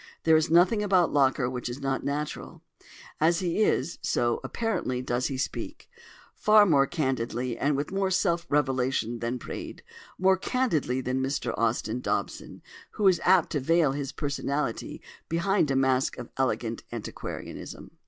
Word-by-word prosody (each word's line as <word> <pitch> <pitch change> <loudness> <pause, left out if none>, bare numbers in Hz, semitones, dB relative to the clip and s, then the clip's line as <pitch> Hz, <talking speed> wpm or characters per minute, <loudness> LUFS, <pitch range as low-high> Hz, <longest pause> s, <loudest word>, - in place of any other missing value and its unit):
There 160 -1 +5
is 155 +1 +2
nothing 180 +6 +4
about 190 -4 +2
Locker 135 -2 +3
which 125 -1 -4
is 120 +3 -6
not 135 -1 -2
natural. 145 +1 -4 0.6
As 165 +2 +3
he 180 +2 -1
is, 170 -6 +1
so 120 -1 0
(apparently) 220 - -2
does 125 0 -1
he 135 - -4
speak: 130 - -5 0.5
far 210 0 +5
more 140 -7 +4
candidly 125 -4 -2
and 145 +3 0
with 145 +4 -3
more 195 0 0
of 190 - 0
self 170 -3 0
revelation 130 -4 0
than 120 +2 -2
Praed, - - -8 0.3
more 190 +1 +4
candidly 175 - 0
than 130 +1 -1
Mr 130 -3 -2
Austin 115 +1 0
Dobson, - - -3 0.3
who 210 -2 +2
is 185 -2 +4
apt 185 -2 +4
to 145 - 0
veil 165 +1 +3
his 140 -1 -4
personality 140 -3 -3 0.3
behind 170 0 +1
a 135 - +1
mask 130 -1 +1
of - - -8
elegant 120 -3 -1
antiquarianism. - - -7
140 Hz, 155 wpm, -27 LUFS, 130-175 Hz, 0.6 s, There